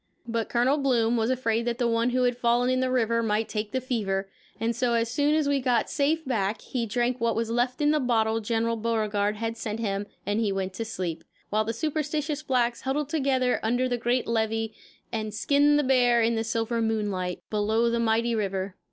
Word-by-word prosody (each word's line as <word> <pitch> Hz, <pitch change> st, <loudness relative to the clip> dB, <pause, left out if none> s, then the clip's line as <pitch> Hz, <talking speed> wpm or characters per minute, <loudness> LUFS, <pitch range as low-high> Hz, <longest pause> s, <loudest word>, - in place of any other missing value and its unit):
But 230 Hz, -1 st, -2 dB
Colonel 255 Hz, +5 st, +2 dB
Bloom 240 Hz, -4 st, +2 dB
was 225 Hz, 0 st, +1 dB
afraid 235 Hz, -3 st, 0 dB
that 235 Hz, -1 st, -1 dB
the 240 Hz, -2 st, +1 dB
one 230 Hz, +1 st, +2 dB
who 250 Hz, +1 st, +1 dB
had 245 Hz, -1 st, +2 dB
fallen 245 Hz, +1 st, +2 dB
in 255 Hz, -, +1 dB
the 260 Hz, 0 st, +1 dB
river 230 Hz, -2 st, +1 dB
might 220 Hz, 0 st, 0 dB
take 210 Hz, -1 st, -3 dB
the 260 Hz, -, 0 dB
fever, 200 Hz, -7 st, -2 dB, 0.3 s
and 230 Hz, +1 st, 0 dB
so 240 Hz, 0 st, +1 dB
as 230 Hz, 0 st, 0 dB
soon 290 Hz, +3 st, +2 dB
as 310 Hz, -2 st, +1 dB
we 285 Hz, -1 st, +2 dB
got 250 Hz, -3 st, +1 dB
safe 315 Hz, +2 st, +1 dB
back 215 Hz, -4 st, -1 dB
he 240 Hz, -3 st, -3 dB
drank 240 Hz, +3 st, -1 dB
what 230 Hz, -1 st, +1 dB
was 230 Hz, 0 st, -1 dB
left 245 Hz, +3 st, 0 dB
in 295 Hz, 0 st, +4 dB
the 305 Hz, -, +2 dB
bottle 225 Hz, -4 st, +1 dB
General 230 Hz, +1 st, 0 dB
Beauregard 215 Hz, -2 st, 0 dB
had 225 Hz, +1 st, -3 dB
sent 220 Hz, 0 st, -4 dB
him 200 Hz, -2 st, -2 dB, 0.2 s
and 205 Hz, +2 st, 0 dB
he 215 Hz, -3 st, +1 dB
went 190 Hz, -1 st, -2 dB
to 225 Hz, +4 st, -4 dB
sleep; 180 Hz, -7 st, -4 dB, 0.3 s
while 215 Hz, +1 st, +1 dB
the 225 Hz, -, -1 dB
superstitious 300 Hz, +3 st, -2 dB
blacks 245 Hz, -5 st, 0 dB
huddled 275 Hz, +2 st, -1 dB
together 265 Hz, -4 st, +1 dB
under 245 Hz, +3 st, +1 dB
the 245 Hz, -, 0 dB
great 240 Hz, +1 st, 0 dB
levee 225 Hz, -1 st, -1 dB, 0.4 s
and 215 Hz, -2 st, -3 dB
skinned 290 Hz, +5 st, +3 dB
the 295 Hz, -, +2 dB
bear 250 Hz, -3 st, +4 dB
in 230 Hz, +1 st, +2 dB
the 225 Hz, -1 st, 0 dB
silver 230 Hz, 0 st, -1 dB
moonlight, 205 Hz, -5 st, -2 dB
below 215 Hz, +2 st, +1 dB
the 235 Hz, 0 st, +1 dB
mighty 230 Hz, +1 st, +1 dB
river. 195 Hz, -3 st, -2 dB
230 Hz, 210 wpm, -26 LUFS, 220-255 Hz, 0.4 s, in